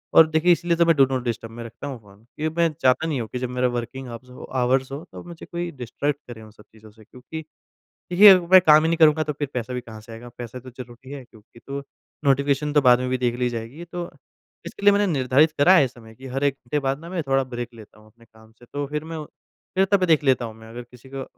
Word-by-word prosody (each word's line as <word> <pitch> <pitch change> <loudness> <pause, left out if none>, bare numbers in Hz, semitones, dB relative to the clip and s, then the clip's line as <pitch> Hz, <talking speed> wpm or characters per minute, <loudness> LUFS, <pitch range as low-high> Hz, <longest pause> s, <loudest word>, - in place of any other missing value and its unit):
और 160 - +8
देखिए 160 +3 +3
इसलिए 170 0 +1
तो 170 - +4
मैं 165 -1 +4
डू 135 -2 +6
नॉट 130 -2 -3
डिस्टर्ब 115 -1 -4
मैं 120 +1 -8
रखता 115 +5 -9
हूँ 130 -4 -6
फ़ोन 100 +1 -20
क्योंकि 155 +1 -3
मैं 165 -1 +3
चाहता 130 +5 +3
नहीं 145 -5 -2
हूँ 110 - -5
कि 125 - -4
जब 125 -1 -3
मेरा 125 0 0
वर्किंग 120 +2 -5
आफज 120 +2 -10 0.3
आवर्स 130 +2 +1
हो 145 +4 -6
तो - - -10
मुझे 170 -1 -11
कोई 175 0 -4
डिस्ट्रैक्ट 145 +4 -2
करे 115 -2 -10
उन 110 -1 -14
सब 105 0 -19
चीज़ों 110 -1 -17
से 110 0 -19
क्योंकि 130 +8 -9 0.7
देखिए 200 +4 +9
अगर 185 -2 +7
मैं 185 -1 +9
काम 155 +1 +7
ही 165 - +1
नहीं 165 - 0
करूँगा 155 -1 +5
तो 150 0 -3
फिर 145 - -1
पैसा 125 0 -4
भी 125 - -3
कहाँ 110 -2 -11
से 115 +1 -14
आएगा? 120 +2 -10
पैसा 120 +1 -7
तो 130 +1 -12
ज़रूरी 125 +1 -12
है 140 -2 -7
क्योंकि 115 0 -20
तो 140 0 -5 0.4
नोटिफ़िकेशन 140 +2 +1
तो 145 - +4
बाद 125 -1 +5
में 125 0 -2
भी 130 - 0
देख 120 -1 -1
ली 125 0 +1
जाएगी 120 +8 -7
तो 175 -1 -5 0.6
इसके - - -9
लिए 205 - +8
मैंने 205 0 +2
निर्धारित 135 +4 +3
करा 175 +7 +6
है 145 - +5
इस 130 - -8
समय 110 -2 -15
कि 130 +2 -11
हर 135 +1 -2
1 140 -1 +2
घंटे 135 +3 -3
बाद 135 +1 -2
ना 170 +1 -10
मैं 175 -4 -3
थोड़ा 135 0 +2
ब्रेक 120 -2 -6
लेता 110 -1 -15
हूँ 110 - -20
अपने 115 +1 -22
काम 110 0 -21
से। 120 +2 -20
तो 145 0 -2
फिर 150 +1 -4
मैं 160 -1 -6 0.5
फिर 190 +1 +4
तभी 190 -2 +4
देख 160 -3 +3
लेता 130 -3 +2
हूँ 110 - -8
मैं, 110 0 -14
अगर 120 +2 -8
किसी 125 +2 -16
को 135 - -4
130 Hz, 270 wpm, -23 LUFS, 120-155 Hz, 0.7 s, देखिए